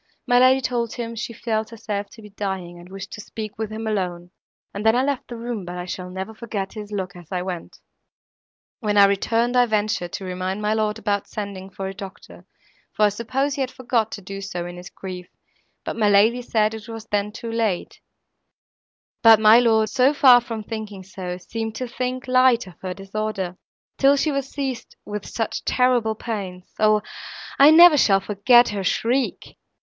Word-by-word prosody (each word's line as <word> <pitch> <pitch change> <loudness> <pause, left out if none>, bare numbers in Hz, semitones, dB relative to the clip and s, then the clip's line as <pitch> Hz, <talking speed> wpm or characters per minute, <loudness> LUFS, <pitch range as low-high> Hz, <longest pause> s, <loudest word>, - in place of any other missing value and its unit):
My 245 0 +4
lady 260 +1 +5
told 240 -2 -1
him 230 -1 -5
she 230 +1 -4
felt 220 -1 -2
herself 205 -3 -5
to 225 - -14
be 210 - -12
dying, 190 -4 -5
and 175 +1 -13
wished 195 0 -8
to 210 - -7
speak 215 0 -8
with 220 -1 -3
him 220 +1 -5
alone, 180 -5 -3 0.4
and 205 - -5
then 220 +1 +4
I 255 - +2
left 280 -2 -2
the 240 - -7
room, 230 -3 -4
but 175 0 -7
I 180 - -5
shall 180 0 -6
never 190 +4 -6
forget 215 -4 -5
his 210 -1 -8
look 190 -3 -4
as 175 -3 -14
I 180 -1 -2
went." 180 -2 -6 1.0
"When 210 -3 0
I 200 - +9
returned, 225 +5 +1
I 245 -1 +5
ventured 210 -5 -1
to 195 - -5
remind 185 +2 -3
my 210 0 0
lord 215 -1 0
about 205 -2 -1
sending 200 -2 -6
for 195 0 -6
a 190 - -5
doctor, 195 -1 -11 0.4
for 215 - +2
I - - +4
supposed 255 +7 -2
he - - -1
had 260 - -1
forgot 240 -4 -1
to 200 - -7
do 195 +1 -7
so, 180 -3 -5
in 175 0 -7
his 180 0 -9
grief; 180 -2 -8 0.6
but - - -3
my 215 -2 +2
lady 220 +5 +4
said 220 -2 +1
it 220 -1 -8
was 225 -1 -8
then 205 -1 -1
too 230 +2 -7
late; 225 -5 -2 1.2
but 225 -2 +8
my 220 +2 +7
lord, 220 -2 +3
so 265 +2 +3
far 250 -4 +7
from 225 -2 -6
thinking 210 -3 -6
so, 180 -1 -6
seemed 225 +4 -5
to 255 - -4
think 255 +1 -4
light 255 -2 +4
of 185 - -12
her 185 -1 -4
disorder—till 200 +6 -2
she 295 +2 +1
was 275 -1 -2
seized 270 -4 -5
with 210 -1 -5
such 225 -2 -3
terrible 245 -3 +2
pains! 195 -6 -6
O, 215 -1 +4 0.6
I 280 +2 +9
never 330 0 +8
shall 195 -5 +4
forget 225 +5 +4
her 200 -2 -3
shriek! 245 +7 -1
215 Hz, 195 wpm, -23 LUFS, 195-235 Hz, 1.2 s, I